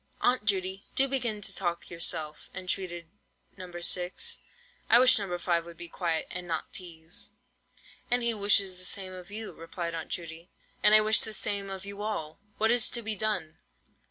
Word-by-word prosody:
"Aunt 245 -3 +2
Judy, 190 -1 0
do 270 - +5
begin 240 -6 0
to 195 - +1
talk 170 -1 -2
yourself," 160 -2 +1
entreated 180 -2 -2 0.5
No. 185 -2 -8
6. 180 - +1 0.5
"I 235 - +8
wish 255 -1 +7
No. 185 -3 -2
5 170 -1 +1
would 170 -1 -11
be 170 +1 -7
quiet, 165 -2 -1
and 180 0 -4
not 165 -2 -3
teaze." 165 -2 -3 0.8
"And 245 0 +2
he 235 0 +2
wishes 200 -3 +2
the - - -5
same 185 0 -1
of 180 0 -10
you," 215 +1 -6
replied 170 +1 -5
Aunt 165 -1 -5
Judy, 165 0 -5 0.3
"and 210 - +8
I 215 - +8
wish 215 0 +4
the 220 - -3
same 200 -1 -1
of 190 0 -6
you 200 0 -7
all. 160 -8 -3 0.2
What 220 +1 +3
is 240 -2 +4
to 235 -1 -2
be 220 0 0
done? 205 -7 -1
185 Hz, 185 wpm, -29 LUFS, 170-215 Hz, 0.8 s, I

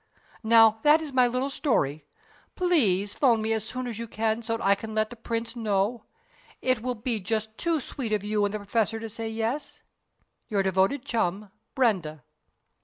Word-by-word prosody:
Now, 225 -1 +6
that 300 +4 +6
is 310 -4 -7
my 255 -1 +5
little 255 +3 -1
story. 150 - 0 0.5
Please 210 - +2
'phone 240 -5 +3
me 220 +1 0
as 220 -2 -1
soon 255 +3 -5
as 230 -3 -5
you 230 - -5
can 220 +1 -1
so 225 0 -2
that - - -6
I 200 - +6
can 220 +2 -6
let 215 +1 0
the - - -8
Prince 230 +1 -4
know. 215 0 -1 0.5
It 255 -3 +1
will 250 +1 -2
be 230 0 -1
just 220 +2 -2
too 335 +3 0
sweet 255 -4 -5
of 210 -2 0
you 210 0 0
and 205 - +1
the 215 - -2
Professor 220 +2 -1
to 225 0 -6
say 225 +1 -5
'yes.' 225 +6 -3 0.7
Your 200 -2 0
devoted 190 +8 +1
chum, 205 -5 -2 0.2
BRENDA." 180 - 0
225 Hz, 185 wpm, -26 LUFS, 210-245 Hz, 0.7 s, Now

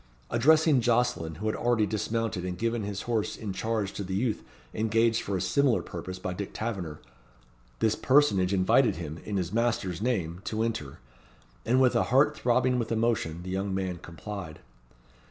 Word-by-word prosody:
Addressing 150 +3 +4
Jocelyn, 120 -9 +1
who 105 - -7
had 110 - 0
already 120 -3 +2
dismounted 110 -2 -2
and 90 -1 -4
given 115 +2 -1
his 100 -1 -4
horse 115 -3 -1
in 105 -3 -5
charge 110 0 -2
to 100 - -4
the 95 0 -4
youth 110 +2 0 0.3
engaged 115 +1 +2
for 100 -1 -2
a - - -3
similar 120 +7 +2
purpose 90 +2 -6
by 95 0 -4
Dick 100 +2 -6
Taverner, 95 -9 -4 0.8
this 110 - +3
personage 110 -11 +3
invited 95 -2 +3
him, 80 -1 -6
in 105 -2 -2
his 90 0 -2
master's 110 -7 0
name, 95 -8 -1
to 110 0 -1
enter; 110 -12 -3 0.7
and, 125 +3 +4
with 130 -2 +4
a - - +3
heart 135 +4 +3
throbbing 125 +1 +2
with 115 - -3
emotion, 110 -8 0
the 90 - -6
young 95 0 -1
man 95 -2 -2
complied. 85 -1 -7
105 Hz, 170 wpm, -28 LUFS, 95-115 Hz, 0.8 s, Addressing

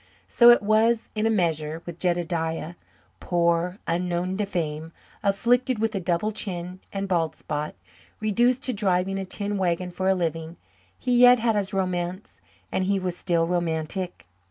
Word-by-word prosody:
So 240 -1 +6
it 240 -3 +6
was, 220 +2 +2
in 215 0 0
a - - +2
measure, 165 -5 0
with 175 -1 -8
Jedediah; 170 -2 -1 0.5
poor, 170 +1 +1
unknown 175 +2 -1
to 205 -1 -1
fame, 160 -3 -3 0.3
afflicted 235 +5 +2
with 225 +1 0
a 195 - -1
double 180 +4 0
chin 185 -3 -5
and 195 0 -3
bald 170 -4 0
spot, 150 0 -4 0.4
reduced 235 +4 +2
to 255 - 0
driving 195 -2 0
a 190 - -4
tin 200 +2 -3
wagon 180 0 -1
for 185 +2 -1
a 190 - +4
living, 165 -1 -3 0.4
he 250 -1 0
yet 245 0 +8
had 225 -1 +1
his 200 -2 -1
romance 185 0 -3 0.3
and 190 - 0
he 200 +1 +1
was 185 -2 -3
still 170 -2 +1
romantic. 170 - -2
185 Hz, 160 wpm, -25 LUFS, 170-210 Hz, 0.5 s, yet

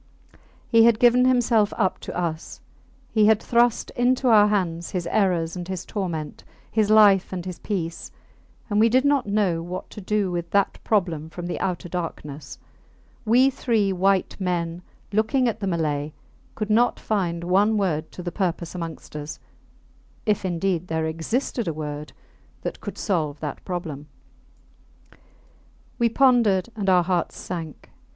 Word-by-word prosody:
He 230 -1 +5
had 235 -2 +5
given 245 +2 +5
himself 240 -4 +3
up 190 -4 +1
to - - -7
us; 165 -2 -4 0.5
he 215 -2 +4
had 220 -1 +5
thrust 235 0 +1
into 250 +1 +2
our 210 -2 +7
hands 175 -5 -1
his 180 -2 -3
errors 175 -5 +1
and 175 -1 -6
his 185 -1 -5
torment, 170 -7 -4 0.3
his 215 -2 +1
life 205 -3 +6
and 180 -2 -5
his 180 -2 -6
peace; 170 -5 -4 0.6
and 210 -2 +1
we 225 +1 +5
did 255 +4 +3
not 280 -5 +2
know 200 -5 +1
what 175 +2 -7
to 210 - -8
do 200 -1 0
with 170 -1 -3
that 200 +1 +1
problem 170 -7 0
from 175 +2 -7
the 175 - -4
outer 180 -1 -2
darkness. 160 -4 -6 0.7
We 250 +5 +5
three 215 -6 0
white 190 +1 +1
men, 175 -2 -2 0.3
looking 235 +5 +2
at 225 -1 -2
the 200 - -3
Malay, 150 -4 -1 0.4
could 215 -1 -3
not 235 +3 +3
find 175 -5 -1
one 200 +5 +3
word 160 -6 -1
to 180 - -8
the 175 - -4
purpose 175 -3 -2
amongst 165 -4 -7
us 150 0 -6 0.9
if 210 -3 +1
indeed 180 -1 -1
there 160 -1 -1
existed 210 - -2
a 165 - -1
word 150 0 -5 0.5
that - - -5
could - - -7
solve 155 -8 -1
that 150 -3 -5
problem. 160 -6 -5 1.9
We 235 -1 +3
pondered, 230 -7 +3
and 200 -3 -1
our 180 -1 +5
hearts 175 -1 -1
sank. 165 -4 -7
185 Hz, 155 wpm, -24 LUFS, 170-215 Hz, 1.9 s, our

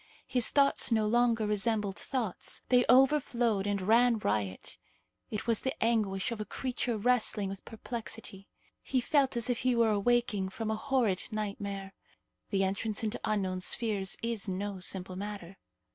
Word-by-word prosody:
His 250 -3 +3
thoughts 280 -3 +3
no 220 -2 +2
longer 230 0 +2
resembled 210 -1 0
thoughts. 235 -7 -4
They 250 -1 +4
overflowed 245 -6 +3
and 200 -1 0
ran 230 +3 +4
riot; 100 - -3 0.5
it 210 - -4
was 230 -2 +1
the 265 +2 -2
anguish 215 -4 0
of 225 -2 -4
a - - -1
creature 245 -2 -3
wrestling 215 -3 +2
with 195 -1 -8
perplexity. 225 -3 -7 0.3
He 260 - 0
felt 270 0 +1
as 235 - 0
if 245 -2 0
he 255 -1 +1
were 230 -2 +3
awaking 210 -2 +1
from 220 +3 -4
a - - 0
horrid 235 -6 0
nightmare. 200 -2 -5 0.6
The 195 -2 +1
entrance 200 +3 -2
into 215 - -2
unknown 190 -3 -1
spheres 200 -1 +1
is 230 -3 -1
no 195 +1 -4
simple 185 0 -2
matter. 195 -2 -7
215 Hz, 155 wpm, -30 LUFS, 195-240 Hz, 0.6 s, They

